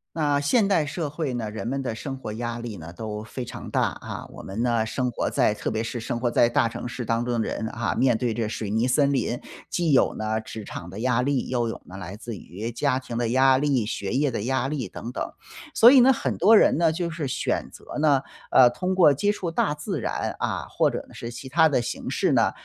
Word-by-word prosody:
那 145 Hz, -3 st, +2 dB
现 200 Hz, -, +3 dB
代 180 Hz, -6 st, +2 dB
社 150 Hz, +1 st, -3 dB
会 150 Hz, -2 st, -3 dB
呢， 115 Hz, -3 st, -3 dB
人 110 Hz, +2 st, -5 dB
们 135 Hz, +2 st, -1 dB
的 125 Hz, -4 st, -3 dB
生 135 Hz, +4 st, -5 dB
活 110 Hz, -, -6 dB
压 120 Hz, +1 st, -4 dB
力 115 Hz, -3 st, -6 dB
呢， 80 Hz, +1 st, -9 dB
都 105 Hz, +2 st, -5 dB
非 125 Hz, +4 st, -6 dB
常 -, -, -8 dB
大 -, -, +2 dB
啊。 -, -, -4 dB
我 -, -, -11 dB
们 100 Hz, +4 st, -4 dB
呢， 120 Hz, -2 st, +1 dB
生 125 Hz, +3 st, -1 dB
活 120 Hz, -, -2 dB
在 105 Hz, -, +2 dB
特 -, -, -3 dB
别 110 Hz, +1 st, -1 dB
是 115 Hz, +1 st, -4 dB
生 115 Hz, +1 st, -3 dB
活 120 Hz, 0 st, +1 dB
在 120 Hz, -, +4 dB
大 120 Hz, -1 st, +2 dB
城 115 Hz, +1 st, -6 dB
市 120 Hz, 0 st, -5 dB
当 115 Hz, +1 st, 0 dB
中 120 Hz, -2 st, 0 dB
的 -, -, -2 dB
人 110 Hz, -, -3 dB
啊， 110 Hz, -7 st, -2 dB
面 125 Hz, -2 st, +3 dB
对 120 Hz, +1 st, 0 dB
着 115 Hz, -2 st, -1 dB
水 110 Hz, -1 st, -4 dB
泥 110 Hz, +4 st, +1 dB
森 140 Hz, +2 st, +3 dB
林， 125 Hz, -3 st, -1 dB, 0.3 s
既 170 Hz, -3 st, +1 dB
有 135 Hz, -, +4 dB
呢， 110 Hz, 0 st, -2 dB
职 110 Hz, 0 st, -8 dB
场 90 Hz, -, -7 dB
的 95 Hz, -, -7 dB
压 125 Hz, +1 st, +1 dB
力， 140 Hz, -1 st, 0 dB
又 120 Hz, -2 st, 0 dB
有 115 Hz, -, -5 dB
呢， 95 Hz, -, -10 dB
来 95 Hz, 0 st, -7 dB
自 115 Hz, 0 st, -7 dB
于 105 Hz, +7 st, -6 dB
家 130 Hz, +2 st, 0 dB
庭 125 Hz, -3 st, -6 dB
的 120 Hz, -1 st, 0 dB
压 130 Hz, +2 st, +5 dB
力、 135 Hz, -6 st, +1 dB
学 100 Hz, -3 st, -3 dB
业 140 Hz, +3 st, +2 dB
的 110 Hz, -4 st, -3 dB
压 130 Hz, +1 st, 0 dB
力 135 Hz, -6 st, -3 dB
等 115 Hz, +6 st, -7 dB
等。 -, -, -4 dB, 0.4 s
所 235 Hz, -, +8 dB
以 270 Hz, -, +8 dB
呢， 260 Hz, +2 st, +7 dB
很 -, -, -2 dB
多 215 Hz, +6 st, +6 dB
人 -, -, +5 dB
呢， 165 Hz, -1 st, +3 dB
就 170 Hz, +1 st, -2 dB
是 160 Hz, -3 st, -4 dB
选 130 Hz, -, -2 dB
择 -, -, -9 dB
呢， 145 Hz, -3 st, +3 dB, 0.3 s
呃， 125 Hz, -2 st, +7 dB
通 180 Hz, +10 st, -2 dB
过 180 Hz, -5 st, +6 dB
接 205 Hz, +9 st, +2 dB
触 185 Hz, -4 st, -3 dB
大 155 Hz, -2 st, +1 dB
自 150 Hz, 0 st, -4 dB
然， -, -, -2 dB
啊， -, -, -2 dB
或 -, -, +2 dB
者 -, -, -4 dB
呢， -, -, -16 dB
是 115 Hz, -, -6 dB
其 130 Hz, +2 st, -8 dB
他 160 Hz, +4 st, +5 dB
的 140 Hz, -5 st, +1 dB
形 -, -, -5 dB
式 -, -, +1 dB
呢， -, -, +3 dB
125 Hz, 275 characters per minute, -25 LUFS, 115-145 Hz, 0.4 s, 所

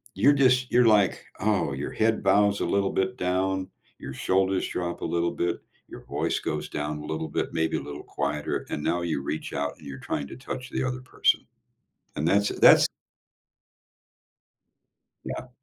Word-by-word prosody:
You're 145 Hz, -, +5 dB
just 125 Hz, -2 st, +3 dB
you're 120 Hz, 0 st, +5 dB
like, 105 Hz, -3 st, +3 dB, 0.2 s
"Oh" 100 Hz, -8 st, +1 dB
your 65 Hz, +2 st, -4 dB
head 110 Hz, 0 st, +1 dB
bows 100 Hz, +1 st, +3 dB
a -, -, 0 dB
little 100 Hz, -1 st, +1 dB
bit 125 Hz, +6 st, -1 dB
down, 95 Hz, -1 st, 0 dB, 0.3 s
your 65 Hz, -, -7 dB
shoulders 95 Hz, +5 st, +1 dB
drop 85 Hz, -1 st, -3 dB
a -, -, -4 dB
little 85 Hz, 0 st, 0 dB
bit, 85 Hz, 0 st, -1 dB, 0.3 s
your -, -, -11 dB
voice -, -, -1 dB
goes -, -, -3 dB
down 75 Hz, +1 st, -3 dB
a 75 Hz, -, -8 dB
little 80 Hz, +1 st, -3 dB
bit, -, -, -2 dB
maybe 80 Hz, 0 st, +1 dB
a -, -, -5 dB
little 75 Hz, 0 st, -7 dB
quieter, 75 Hz, 0 st, -3 dB
and 75 Hz, -, -3 dB
now 85 Hz, -, 0 dB
you 80 Hz, -5 st, -1 dB
reach 75 Hz, +2 st, -4 dB
out 70 Hz, 0 st, -2 dB
and -, -, -14 dB
you're 70 Hz, -1 st, -7 dB
trying 70 Hz, -, -3 dB
to -, -, -9 dB
touch 130 Hz, 0 st, -6 dB
the -, -, -1 dB
other 130 Hz, 0 st, -2 dB
person. 130 Hz, -, +1 dB, 0.7 s
And 75 Hz, -, -1 dB
that's 100 Hz, +4 st, +3 dB
that's -, -, +8 dB, 2.4 s
Yeah. 125 Hz, -, -5 dB
95 Hz, 175 wpm, -26 LUFS, 80-110 Hz, 2.4 s, that's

